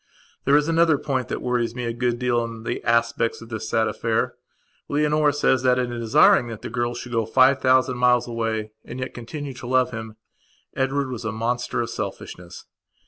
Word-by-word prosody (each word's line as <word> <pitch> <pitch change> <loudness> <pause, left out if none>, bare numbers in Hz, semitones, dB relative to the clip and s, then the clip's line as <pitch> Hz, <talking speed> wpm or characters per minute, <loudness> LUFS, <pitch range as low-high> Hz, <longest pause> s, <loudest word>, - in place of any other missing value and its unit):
There 140 +2 +5
is 150 +1 +1
another 165 -2 +3
point 130 -3 -2
that - - -4
worries 120 -2 -1
me 125 -1 -3
a 115 - -2
good 120 0 -1
deal 120 -1 +1
in 115 -1 -7
the - - -3
aspects 115 0 +1
of 115 - -12
this 110 -2 -5
sad 110 0 +2
affair. 115 -1 -1 0.6
Leonora 150 0 +2
says 135 -3 +2
that, 125 -1 +3
in 125 -1 -1
desiring 115 0 +4
that 115 -2 -8
the - - -6
girl 120 0 -1
should 125 - -7
go 115 -1 +1
five 130 +3 +4
thousand 130 -1 +3
miles 125 -1 +3
away 115 -2 -2
and 120 - -8
yet 130 - -4
continue 140 +4 -6
to 125 -1 -9
love 130 0 +2
him, 110 -2 -7 0.6
Edward 135 0 0
was 120 -2 -5
a 115 - -2
monster 120 +2 -2
of 115 - -4
selfishness. 90 0 -7
120 Hz, 195 wpm, -23 LUFS, 115-130 Hz, 0.6 s, There